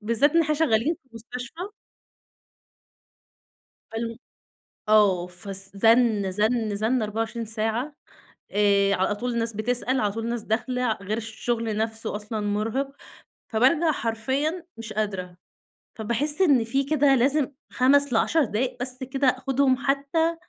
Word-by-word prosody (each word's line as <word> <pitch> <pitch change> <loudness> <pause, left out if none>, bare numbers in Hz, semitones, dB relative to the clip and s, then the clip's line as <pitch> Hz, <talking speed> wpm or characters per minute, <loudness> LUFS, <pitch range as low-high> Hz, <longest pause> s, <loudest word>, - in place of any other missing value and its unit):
بالذات 230 +7 +2
إن 335 - +5
إحنا 305 -1 0
شغالين 290 -1 +2
في 265 - -30
مستشفى. 255 - -7 2.2
فال 230 0 -4 0.7
آه 200 -5 +4
فالس 195 +2 -6
زن، 225 -2 +4
زن، 215 +2 0
زن 225 +4 +1
24 225 +2 -3
ساعة 225 +6 -2 0.6
آآ، 200 -1 +3
على 190 +2 +1
طول 245 +3 -3
الناس 230 0 -1
بتسأل، 245 +4 0
على 205 -1 0
طول 225 +2 -4
ناس 235 -2 -2
داخلة 245 +2 0
غير 205 +2 -2
الشغل 225 0 -3
نفْسه 220 -1 -2
أصلًا 210 +1 -4
مرهِق، 215 +6 -1 0.6
فبارجَع 275 +8 +3
حرفيًا 275 +8 -2
مش 225 -1 -7
قادرة، 190 -4 -3 0.6
فباحس 250 - 0
إن 285 -10 +5
في 270 +5 0
كده 280 -1 +3
لازم 275 +3 +2 0.2
5 280 +1 +3
ل10 310 +7 +3
دقايق 240 +2 -2
بس 255 0 -2
كده 265 +1 0
آخُدهم 260 +1 +2
حتى 280 +5 0
230 Hz, 130 wpm, -25 LUFS, 215-270 Hz, 2.2 s, إن